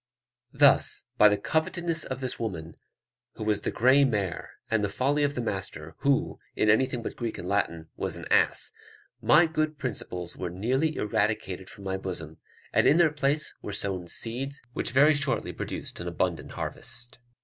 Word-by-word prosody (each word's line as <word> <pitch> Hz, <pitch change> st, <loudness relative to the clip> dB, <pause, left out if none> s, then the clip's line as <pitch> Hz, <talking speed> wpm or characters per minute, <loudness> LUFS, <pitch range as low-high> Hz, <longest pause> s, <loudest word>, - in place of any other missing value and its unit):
Thus, 140 Hz, 0 st, +4 dB, 0.2 s
by 105 Hz, -, +9 dB
the 105 Hz, -, +1 dB
covetousness 160 Hz, +7 st, 0 dB
of 130 Hz, 0 st, -5 dB
this 130 Hz, -2 st, -2 dB
woman, 85 Hz, -8 st, -4 dB, 0.6 s
who -, -, -6 dB
was 105 Hz, -1 st, +1 dB
the -, -, -1 dB
grey 130 Hz, +4 st, +5 dB
mare, 105 Hz, -9 st, -1 dB, 0.2 s
and 110 Hz, -2 st, +2 dB
the 100 Hz, -, +1 dB
folly 140 Hz, +8 st, +1 dB
of 145 Hz, 0 st, +1 dB
the 125 Hz, -, -1 dB
master, 95 Hz, -8 st, -4 dB
who, 140 Hz, -1 st, +1 dB, 0.2 s
in 105 Hz, -, +4 dB
anything 125 Hz, +1 st, +1 dB
but -, -, -5 dB
Greek 115 Hz, -2 st, -4 dB
and 90 Hz, -, -6 dB
Latin, 85 Hz, -5 st, -1 dB
was -, -, -3 dB
an -, -, -8 dB
ass, -, -, +3 dB, 0.5 s
my 160 Hz, +3 st, +6 dB
good 155 Hz, -1 st, -1 dB
principles 100 Hz, -9 st, -5 dB
were 90 Hz, -, -4 dB
nearly 130 Hz, -, 0 dB
eradicated 105 Hz, -3 st, -1 dB
from 100 Hz, -, -12 dB
my 95 Hz, 0 st, -2 dB
bosom, 85 Hz, -5 st, -6 dB, 0.3 s
and -, -, +4 dB
in 150 Hz, -, +6 dB
their 170 Hz, -3 st, +5 dB
place 145 Hz, +1 st, 0 dB
were 105 Hz, -, -6 dB
sown 95 Hz, -3 st, -2 dB
seeds 130 Hz, -, -2 dB
which -, -, 0 dB
very 145 Hz, +5 st, +5 dB
shortly 140 Hz, -5 st, -1 dB
produced -, -, -6 dB
an -, -, -5 dB
abundant -, -, -2 dB
harvest. 120 Hz, +2 st, -3 dB
115 Hz, 175 wpm, -27 LUFS, 100-140 Hz, 0.6 s, by